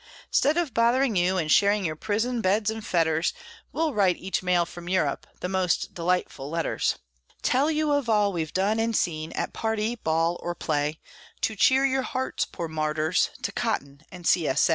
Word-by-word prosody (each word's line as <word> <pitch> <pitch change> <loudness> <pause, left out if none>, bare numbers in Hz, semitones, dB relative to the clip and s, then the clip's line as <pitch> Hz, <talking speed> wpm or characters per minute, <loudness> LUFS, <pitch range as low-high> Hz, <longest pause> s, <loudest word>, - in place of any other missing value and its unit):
'Stead 295 +5 +3
of 335 -8 0
bothering 235 +1 +3
you, 185 +1 +2
and 155 -3 0
sharing 200 -1 +4
your 155 -1 -1
prison 225 +7 -1
beds 210 +2 +2
and 220 0 -6
fetters, 165 -3 +1 0.4
We'll 320 -2 0
write 195 -5 +3
each 190 +1 -2
mail 180 -2 +2
from 175 0 -9
Europe 165 -7 0
the - - -1
most 185 -2 0
delightful 170 -5 -1
letters; 165 +1 0 0.5
Tell 275 +4 +2
you 310 -1 +1
of 285 -4 +1
all 210 -2 +3
we've 160 -3 -3
done 200 +4 +1
and 225 0 0
seen, 160 -2 -1
at - - -3
party, 220 0 -1
ball, 165 -2 0
or 175 0 -3
play, 150 -1 -1 0.4
To 220 - 0
cheer 265 +6 +4
your 265 0 +2
hearts, 260 0 -2
poor 170 - -6
martyrs, 155 +1 0
to - - -1
cotton 140 +1 -3
and 180 -2 -10
C. 165 -3 +3
S. 130 - +3
185 Hz, 185 wpm, -26 LUFS, 165-225 Hz, 0.5 s, sharing